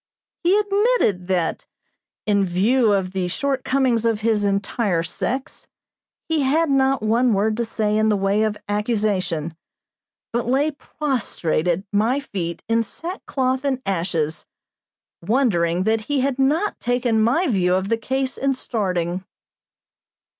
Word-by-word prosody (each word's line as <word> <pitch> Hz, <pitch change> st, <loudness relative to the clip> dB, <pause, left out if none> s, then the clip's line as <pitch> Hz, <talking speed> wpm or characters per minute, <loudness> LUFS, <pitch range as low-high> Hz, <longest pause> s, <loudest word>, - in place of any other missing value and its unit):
He 365 Hz, +4 st, +4 dB
admitted 410 Hz, -, +1 dB
that, 180 Hz, -3 st, -1 dB, 0.6 s
in 200 Hz, -2 st, +2 dB
view 210 Hz, +6 st, +2 dB
of 190 Hz, -2 st, 0 dB
the 185 Hz, -2 st, -1 dB
shortcomings 260 Hz, +1 st, 0 dB
of 225 Hz, -2 st, +1 dB
his 215 Hz, -2 st, +1 dB
entire 200 Hz, -2 st, 0 dB
sex, 255 Hz, +10 st, -4 dB, 0.6 s
he 320 Hz, -2 st, +1 dB
had 295 Hz, +3 st, +2 dB
not 270 Hz, -3 st, +2 dB
one 230 Hz, +2 st, +3 dB
word 210 Hz, +2 st, +1 dB
to 235 Hz, -, 0 dB
say 215 Hz, -1 st, -1 dB
in 215 Hz, 0 st, +3 dB
the 210 Hz, -, +2 dB
way 195 Hz, +2 st, +1 dB
of 215 Hz, -1 st, 0 dB
accusation, 205 Hz, -7 st, -1 dB, 0.8 s
but 235 Hz, 0 st, -1 dB
lay 280 Hz, +5 st, +2 dB
prostrate 250 Hz, -, -2 dB
at 175 Hz, +2 st, +1 dB
my 225 Hz, +7 st, +2 dB
feet 180 Hz, -11 st, -5 dB
in 230 Hz, +1 st, +2 dB
sackcloth 265 Hz, -, -3 dB
and 270 Hz, -2 st, 0 dB
ashes, 165 Hz, -5 st, -1 dB, 0.7 s
wondering 180 Hz, -5 st, +1 dB
that 220 Hz, +2 st, +1 dB
he 285 Hz, -2 st, +1 dB
had 270 Hz, 0 st, -1 dB
not 310 Hz, +10 st, +1 dB
taken 245 Hz, -2 st, +1 dB
my 255 Hz, +11 st, +2 dB
view 185 Hz, -, +2 dB
of 190 Hz, +1 st, -1 dB
the 230 Hz, -, +2 dB
case 265 Hz, +2 st, -2 dB
in 275 Hz, 0 st, +1 dB
starting. 185 Hz, -7 st, -2 dB
220 Hz, 140 wpm, -22 LUFS, 190-265 Hz, 0.8 s, He